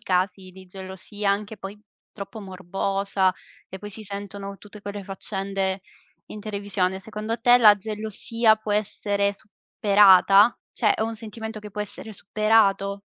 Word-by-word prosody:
casi 185 -1 -1
di 185 +1 -14
gelosia, 190 +2 -4
anche 210 +2 -2
poi 200 +1 -9 0.3
troppo 200 +2 -8
morbosa, 195 0 -1 0.4
e 190 - -7
poi 205 - -8
si 215 +2 -7
sentono 200 0 -6
tutte 205 +1 -13
quelle 205 0 -6
faccende 195 0 -3 0.5
in 210 - -9
televisione, 200 -3 -2
secondo 215 +3 -4
te 245 +1 +7
la 215 -4 +8
gelosia 220 +2 +1
può 215 -1 -4
essere 205 -1 0
superata? 200 +1 +4 0.2
Cioè, 215 -4 +3
è - - -5
un 225 +1 -2
sentimento 220 0 -7
che 210 0 -10
può 210 - -5
essere 210 +1 -5
superato? 205 -1 +2
205 Hz, 145 wpm, -24 LUFS, 195-215 Hz, 0.5 s, la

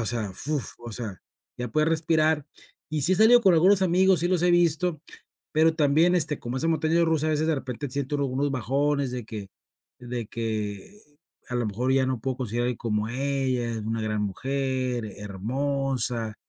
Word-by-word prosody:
o - - -2
sea, 110 -4 -1
¡fuf!, 145 0 -3
o 120 0 -9
sea, 105 -4 -4 0.4
ya 125 -1 -4
podía 155 +5 +1
respirar, 160 -2 +2 0.4
y 155 -2 -2
si 185 - +3
he - - +5
salido 225 +4 +7
con 195 -5 +5
algunos 190 +4 +5
amigos, 185 +1 +4
sí, 175 - +1
los 180 -2 +1
he 180 - +4
visto, 175 -1 +2 0.5
pero 160 +1 +4
también, 160 +3 +3
este, 155 -4 0
como 120 +2 -4
esa 165 +5 0
montaña 160 +1 +2
rusa, 160 -2 +1
a - - +1
veces 155 +1 +1
de 160 - +2
repente 130 +1 -5
siento 140 +1 -2
uno 140 -1 0
unos 135 +2 -1
bajones 140 +2 0
de 125 -3 -4
que 105 -3 -7 0.5
de 120 -2 -5
que 110 - -4 0.5
a 125 - -4
lo 120 - 0
mejor 125 +6 -1
ya 135 -1 +3
no 130 -3 -2
puedo 130 +2 -2
conseguir 120 -1 -2
a - - 0
alguien 125 -1 -2
como 105 -1 -1
ella, 130 -1 -1
es 115 - -3
una 110 +1 -3
gran 105 -1 -1
mujer, 130 +3 -2
hermosa, 120 +2 -2
135 Hz, 195 wpm, -26 LUFS, 120-155 Hz, 0.5 s, salido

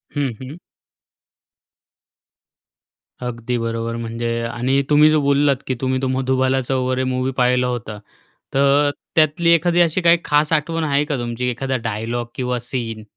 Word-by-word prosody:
हं 140 -4 -1
हं. 140 +6 -9 2.7
अगदी 120 0 -3
बरोबर. 115 0 -3
म्हणजे 115 0 -3
आणि 130 +3 0
तुम्ही 150 +1 +6
जो 155 -1 +3
बोललात, 140 0 +3
की 130 - -1
तुम्ही 130 0 0
तो 130 - 0
मधुबालाचं 130 0 0
वगैरे 130 0 0
मूव्ही 130 0 -1
पाहिला 125 0 +2
होता, 115 -4 -4 0.6
तर 140 +1 +3 0.3
त्यातली 160 +2 +3
एखादी 175 +1 +3
अशी 170 +2 +2
काही 170 0 +5
खास 150 +2 +2
आठवण 160 +1 0
आहे 145 -1 +1
का 145 -3 -2
तुमची? 120 +1 -3
एखादा 130 +2 -2
डायलॉग 115 +3 -3
किंवा 125 -1 -2
सीन? 115 -3 -5
130 Hz, 140 wpm, -20 LUFS, 120-145 Hz, 2.7 s, तुम्ही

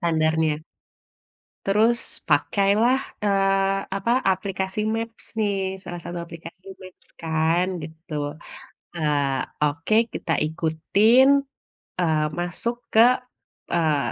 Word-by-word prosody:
Standarnya. 160 -2 +1 1.0
Terus 220 +4 +3 0.3
pakailah, 215 +6 +3 0.3
eee, 195 -1 +2 0.2
apa, 200 +4 -2 0.2
aplikasi 190 +1 -4 0.2
maps 225 0 -4
nih, 205 -2 +1 0.3
salah 175 -2 -7
satu 175 0 -5
aplikasi 170 +2 -12 0.2
maps 185 -1 -13
kan, 165 +2 +1 0.2
gitu. 160 +2 -11 0.8
Eee, 145 -4 0 0.2
oke 160 +8 0 0.2
kita 165 - -4
ikutin, 170 +11 +3 0.7
eee, 160 -3 +2 0.2
masuk 175 +7 -2 0.2
ke, 220 - +5 0.7
eee, 160 -3 +2
175 Hz, 95 wpm, -23 LUFS, 160-200 Hz, 1.0 s, ke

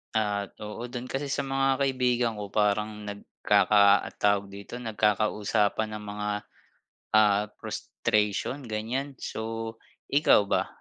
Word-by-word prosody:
Ah, 105 -2 0
oo. 105 +3 -6
Dun 125 0 -5
kasi 140 +1 -3
sa - - -1
mga 135 -1 +1
kaibigan 125 -4 +1
ko 105 -1 -6
parang 105 0 0
nagkaka 100 0 +3 0.2
tawag 100 -1 +2
dito, 100 +4 -9
nagkakausapan 105 -1 0
ng 105 - -7
mga, 105 0 -3 0.9
ah, 105 -1 +5
frustration, 105 +6 -1
ganyan. 120 +6 -3
So 115 0 -4 0.4
ikaw 140 -7 +5
ba, - - +1
110 Hz, 115 wpm, -27 LUFS, 105-125 Hz, 0.9 s, ah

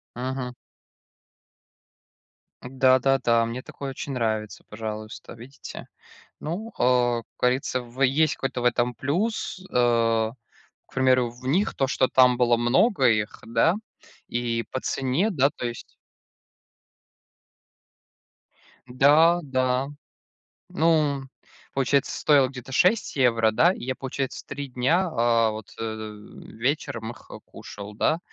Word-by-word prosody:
Мгм. 125 0 -4 2.1
Да-да-да, 130 -2 +3
мне 120 +2 -5
такое 140 +1 -7
очень 135 +1 -6
нравится, 110 -3 -2
пожалуйста, 110 0 -7
видите. 130 +5 -10 0.6
Ну, 195 +9 -5
а, 120 -1 +2
как - - -36
говорится, 130 0 0
в 120 +2 -6
есть 145 +3 +3
какой-то 130 -2 -3
в - - -4
этом 120 0 +1
плюс. 190 +5 -2
А, 115 -2 +2 0.5
к - - -23
примеру, 130 -2 +3
в 125 +2 -13
них 180 +10 +1
то, 135 - +1
что 130 -1 +1
там 125 -1 +5
было 120 -1 +3
много 130 - +3
их, 105 -2 0
да, 115 +10 +3 0.5
и 120 -1 -2
по 130 - -3
цене, 135 +11 0
да, 140 -5 +2
то 125 - -5
есть 120 -1 -8 2.9
Да 150 +7 +5
да. 130 0 0 0.8
Ну, 155 -5 +2 0.5
получается, 135 +1 +1
стоило 140 -4 +4
где-то 130 0 -10
6 185 - +2
евро, 115 -4 +3
да? 170 +11 +4
И - - -8
я, 130 0 -2
получается, 135 0 -5
3 140 0 -6
дня, 145 +10 +1
а 115 -3 +2
вот, 110 -1 -8
а, - - -5
э, 110 -1 -8
вечером 120 -2 -2
их, - - -14
а, - - -8
кушал, 105 +1 -10
да. 155 +9 +1
125 Hz, 125 wpm, -25 LUFS, 115-140 Hz, 2.9 s, там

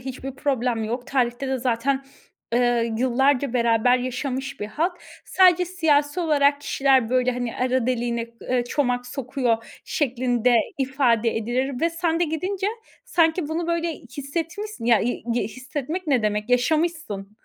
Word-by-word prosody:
hiçbir 265 +1 -6
problem 250 -5 -1
yok. 245 +4 -4
Tarihte 255 0 0
de 265 - 0
zaten, 260 +3 0 0.5
ııı, 240 -1 +3 0.2
yıllarca 265 +1 +2
beraber 235 +1 +3
yaşamış 260 +1 -4
bir 205 - -2
halk. 345 - -2 0.3
Sadece 360 -1 +5
siyasi 320 -3 +1
olarak 290 -3 +3
kişiler, 265 -5 +2
böyle, 255 0 +2
hani, 245 -1 -4
arı 255 -1 +1
deliğine, 235 -2 -1
eee, 250 -1 0
çomak 245 -1 -1
sokuyor 245 -3 -1 0.2
şeklinde 250 -3 +1 0.2
ifade 250 -4 +1
edilir 245 +4 -1
ve 335 - +2
sen 335 0 -1
de 350 - +4
gidince 365 +5 -2 0.4
sanki 325 -7 +2
bunu 330 +1 -2
böyle 335 -1 0
hissetmişsin, 325 - -6
ya 235 -2 +4
i 245 - -2
gi 240 - +1
hissetmek 285 +8 -5
ne 260 -6 +2
demek, 210 +2 -1
yaşamışsın. 250 - 0
260 Hz, 140 wpm, -23 LUFS, 240-305 Hz, 0.5 s, Sadece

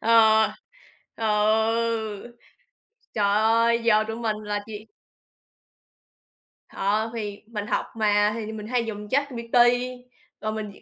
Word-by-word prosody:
Ờ, 220 -1 +5 0.6
ừ, 220 +1 0 0.8
trời 210 -2 +2
ơi, 230 +2 +3
giờ 215 -2 +4
tụi 225 - -4
mình 225 -2 -2
là 205 0 -2
chỉ 215 0 -9 1.8
Ờ, 215 +3 -1
thì 205 -3 -5
mình 210 -2 -5
học - - -1
mà 210 -1 +3
thì 220 -1 -5
mình 215 -1 -7
hay 245 -1 0
dùng 210 -2 -6
ChatGPT 255 -3 -2 0.9
rồi 215 - -2
mình 215 -2 -5
220 Hz, 115 wpm, -25 LUFS, 210-230 Hz, 1.8 s, Ờ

